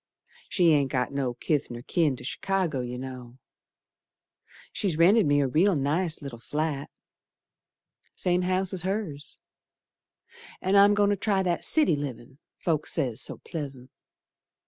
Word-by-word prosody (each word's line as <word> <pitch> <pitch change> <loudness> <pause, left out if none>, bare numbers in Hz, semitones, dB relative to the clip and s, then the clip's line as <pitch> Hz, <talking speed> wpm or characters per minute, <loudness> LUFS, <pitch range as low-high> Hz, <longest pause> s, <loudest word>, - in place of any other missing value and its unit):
She 175 -4 +3
ain't 140 -3 +2
got 125 0 -1
no 135 -3 -2
kith 150 +1 -1
nor 120 0 -8
kin 155 -4 +1
to 125 - -11
Chicago, 180 +1 -1
you 125 0 -4
know 125 -1 -8 1.3
She's 185 -7 -1
rented 190 +3 +5
me 145 0 +3
a 140 - +1
real 170 +9 +3
nice 155 +3 0
little 130 -5 -7
flat, 145 +4 -3 1.2
Same 180 0 0
house 185 +1 0
as 185 - 0
hers, 185 -6 -4 1.2
An' 190 +2 0
I'm 200 +1 +6
goin' 205 0 +3
to - - +2
try 195 -1 0
that 175 -2 -1
city 305 - +4
livin' 135 -2 -7 0.2
folks 155 -3 -1
say's 130 -6 +1
so - - -3
pleasant. 135 -5 -6
155 Hz, 145 wpm, -27 LUFS, 135-185 Hz, 1.3 s, I'm